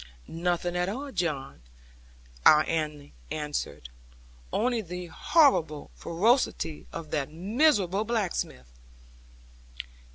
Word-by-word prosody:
'Nothing 175 +1 -1
at 180 +1 0
all, 275 +7 -5
John,' 155 - -3 0.8
our 155 - +8
Annie 150 -3 -3 0.2
answered; 145 - -4 0.6
'only 240 0 +1
the 180 -1 -6
horrible 170 - +2
ferocity 180 - 0
of 155 -2 -7
that 145 -1 -1
miserable 200 - +2
blacksmith.' 190 - -2
175 Hz, 90 wpm, -28 LUFS, 150-215 Hz, 0.8 s, our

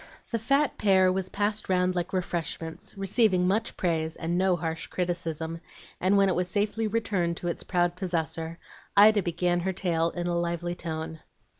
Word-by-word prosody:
The 230 - 0
fat 275 +5 +1
pear 190 -2 +4
was 190 0 -2
passed 205 +1 -1
round 185 0 +2
like 175 0 -2
refreshments, 170 -1 -4
receiving 195 -2 +3
much 215 +4 0
praise 160 -2 0
and 170 +1 -2
no 185 0 +3
harsh 160 -1 -4
criticism; 165 -2 -3 0.4
and 190 +2 +3
when 195 0 +5
it 190 - +2
was 180 0 0
safely 210 +3 0
returned 195 -6 0
to 175 - -4
its 170 - -2
proud 175 -1 +1
possessor, 165 -3 -2 0.4
Ida 210 +1 +7
began 175 0 0
her 190 +2 -1
tale 170 -3 0
in 175 0 -4
a 175 0 0
lively 170 0 -1
tone. 160 -1 -5
180 Hz, 170 wpm, -27 LUFS, 170-195 Hz, 0.4 s, Ida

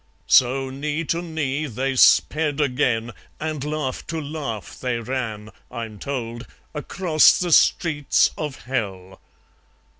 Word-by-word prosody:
So 130 +1 +3
knee 150 +4 -3
to 165 +2 -1
knee 155 -3 -2
they 135 +2 -2
sped 150 +3 +4
again, 125 -5 0 0.3
And 155 -3 -3
laugh 150 -3 -3
to 165 +1 -3
laugh 140 -8 -6
they 125 -2 -1
ran, 110 -3 -4 0.2
I'm 115 -4 -7
told, 120 -2 -5 0.3
Across 155 +1 +3
the 180 -1 -1
streets 150 -2 +3
of 150 -3 -5
Hell 95 -7 -4
135 Hz, 120 wpm, -22 LUFS, 120-155 Hz, 0.3 s, sped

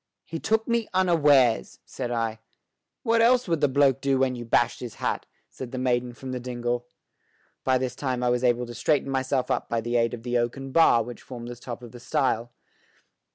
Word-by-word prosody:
"He 165 - -5
took 220 +4 0
me 235 -2 +1
unawares," 145 -10 +3
said 125 -2 -5
I. 115 -2 -2 0.6
"What 230 0 +3
else 245 0 +4
would 165 -3 0
the 145 - +5
bloke 135 -1 +3
do 135 -1 +2
when 130 -1 +1
you 120 - -6
bashed 120 +1 +2
his 120 -3 -7
hat?" - - -2 0.2
said 130 -2 -8
the 130 - -5
maiden 125 -1 0
from 130 +2 -8
the 125 - -3
dingle. 120 0 -3 0.8
By 130 -1 +3
this 130 -1 -3
time 130 -3 -2
I 125 - +2
was 125 0 0
able 125 0 +2
to 120 - -8
straighten 140 +4 +1
myself 130 -1 0
up - - -1
by 115 - 0
the 120 +2 -1
aid 115 0 +1
of 115 - -13
the 120 0 0
oaken 135 +3 -3
bar 130 -7 +5
which 120 +1 -9
formed 120 -2 -8
the 120 - -6
top 120 0 -8
of 120 - -10
the 120 - -11
stile. 120 -3 0
125 Hz, 210 wpm, -26 LUFS, 120-140 Hz, 0.8 s, the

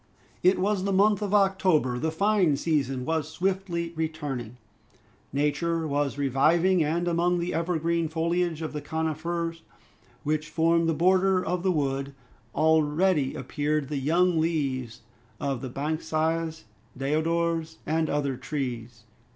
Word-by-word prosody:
It 185 +1 +4
was 195 +1 0
the 200 - 0
month 205 +1 +3
of 205 -2 -2
October. 190 -10 +2
The 160 - 0
fine 190 -3 +2
season 135 -5 -1
was 160 -1 -1
swiftly 175 -1 -2
returning. 145 -7 -4 0.7
Nature 155 +4 0
was 145 -1 -1
reviving; 160 +6 +3
and 170 +3 0
among 175 +1 +2
the 175 +1 -2
evergreen 170 0 0
foliage 165 0 -1
of 155 - -4
the 150 - -4
coniferae 165 +2 -3 0.6
which 155 +1 -1
formed 165 +1 +2
the 165 - +1
border 185 +2 +3
of 180 -1 -1
the 190 +1 +2
wood, 140 -3 -1 0.4
already 155 -1 +2
appeared 145 +2 -2
the 145 -2 -2
young 170 +4 +2
leaves 135 -8 -1 0.4
of 135 -3 -2
the 130 - -5
banksias, 160 +3 -2 0.3
deodars, 160 +3 0
and 160 0 0
other 140 -3 -1
trees. 120 -5 -5
160 Hz, 130 wpm, -27 LUFS, 145-170 Hz, 0.7 s, It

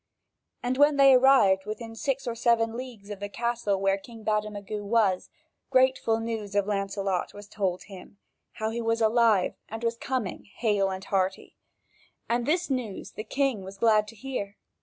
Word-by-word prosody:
And 250 +2 -1
when 290 0 +5
they 275 -1 +7
arrived 230 -7 +5
within 225 +1 -6
six 275 +3 -2
or 240 - -2
seven 230 -1 +2
leagues 235 -5 -8
of 205 - -6
the 205 0 -5
castle 235 -3 -1
where 195 0 +1
King 225 +1 -13
Bademagu 210 -1 -2
was, 205 -3 +1 0.4
grateful 255 -3 +3
news 220 -3 -4
of 200 -1 +3
Lancelot 195 -2 -2
was 205 0 -10
told 190 -3 -2
him, 195 0 -12 0.4
how 220 0 -3
he 235 +1 -3
was 230 0 0
alive 220 -3 +3 0.2
and 225 +2 -6
was 230 0 0
coming 245 -7 -3
hale 205 -4 +1
and 190 0 -5
hearty, 190 -1 -1 0.7
and 235 0 0
this 350 +3 +1
news 250 -8 -4
the 215 - -6
king 260 -2 -1
was 190 +1 -9
glad 215 -1 +3
to 225 - -11
hear. 205 -4 -5
220 Hz, 170 wpm, -27 LUFS, 200-235 Hz, 0.7 s, they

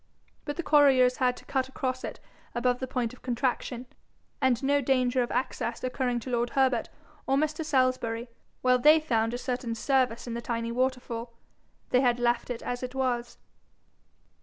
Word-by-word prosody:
But 290 - -3
the 345 - -2
quarriers 270 -5 +5
had 250 -1 0
cut 265 -1 -1
across 255 -1 -3
it - - -6 0.4
above 245 +1 +1
the 260 - -3
point 245 -2 -2
of 255 - -15
contraction; 250 0 -2 0.6
and 260 -2 +2
no 285 +1 +3
danger 255 -1 +2
of 240 - -1
access 240 -2 -2
occurring 250 -1 -1
to 255 - -6
lord 240 0 +1
Herbert 260 -3 +2 0.4
or 270 - +3
Mr. 310 +2 0
Salisbury, 255 -5 0 0.4
while 250 0 +4
they 305 +4 +7
found 230 -7 0
a 245 - -3
certain 245 -2 -3
service 250 -1 +1
in 235 - -5
the 235 - -3
tiny 230 -1 -3
waterfall, 245 -2 -2 0.6
they 250 - +4
had 245 -2 +3
left 240 0 0
it 245 -2 -4
as 245 0 -3
it 255 +1 -5
was. 245 -2 -1
250 Hz, 170 wpm, -28 LUFS, 240-265 Hz, 0.6 s, they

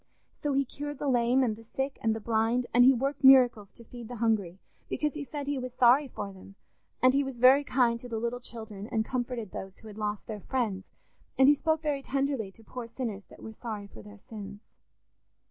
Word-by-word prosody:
So 290 -1 -3
he 275 0 +2
cured 290 +2 -6
the 290 - -3
lame 250 0 +3
and 225 -4 0
the 225 - -14
sick 270 +4 -4
and 220 -1 +1
the - - -4
blind, 225 +3 +1
and 245 +1 +6
he 260 - +8
worked 275 +3 -2
miracles 250 -6 +6
to 235 - -14
feed 235 0 -10
the 245 - -7
hungry 215 -6 0 0.3
because, 300 -1 -1
he 300 - -5
said, 285 0 -6
he 285 -1 -2
was 255 0 -6
sorry 255 +3 +5
for 205 -5 -6
them; 190 +1 -14 0.5
and 255 0 +6
he 280 +1 +3
was 270 -2 -6
very 260 +4 +6
kind 245 -4 +2
to 245 - -9
the 225 - -3
little 235 +2 -2
children 220 -4 -8
and 220 -1 -1
comforted 245 -4 -3
those 195 0 -7
who 220 - -14
had 215 0 -10
lost 210 -1 -3
their 215 -2 -6
friends; 215 -7 -2 0.5
and 265 - +6
he 290 - +8
spoke 315 +2 0
very 290 -2 -1
tenderly 270 -6 -1
to 225 - -18
poor 245 +1 -7
sinners 230 -4 -5
that - - -16
were 220 - -8
sorry 215 -3 -6
for 200 - -13
their 210 0 -13
sins. 205 -1 -10
240 Hz, 225 wpm, -29 LUFS, 220-265 Hz, 0.5 s, he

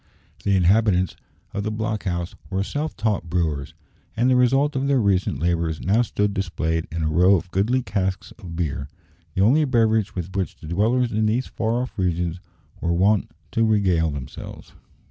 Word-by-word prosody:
The 100 - +2
inhabitants 95 -1 +3 0.4
of 100 - -2
the 105 - -2
block 110 0 -3
house 85 -1 -2 0.2
were 95 0 0
self 150 +8 -3
taught 105 -6 -1
brewers, 80 -3 -1 0.4
and 125 +3 +3
the - - +5
result 135 +4 +3
of 135 +1 0
their 140 -2 +3
recent 100 - +1
labours 85 -1 0
now 105 +6 +2
stood 105 -3 0
displayed 80 -4 -1
in 85 0 -2
a - - +1
row 90 +5 +5
of 90 0 -3
goodly 115 +8 +1
casks 95 -3 -2
of 90 -6 -8
beer 75 -4 -3 0.5
the 95 - +3
only 140 +9 +5
beverage 110 -6 +2
with 90 +1 -5
which 95 -2 -2
the - - -13
dwellers 115 +8 +1
in 110 0 +1
these 120 +4 +1
far 115 +2 -1
off 125 - -8
regions 90 -1 -1 0.4
were 85 - -1
wont 100 +4 +2 0.2
to 115 - +1
regale 95 -7 +2
themselves. 70 -3 -8
100 Hz, 180 wpm, -23 LUFS, 85-110 Hz, 0.5 s, the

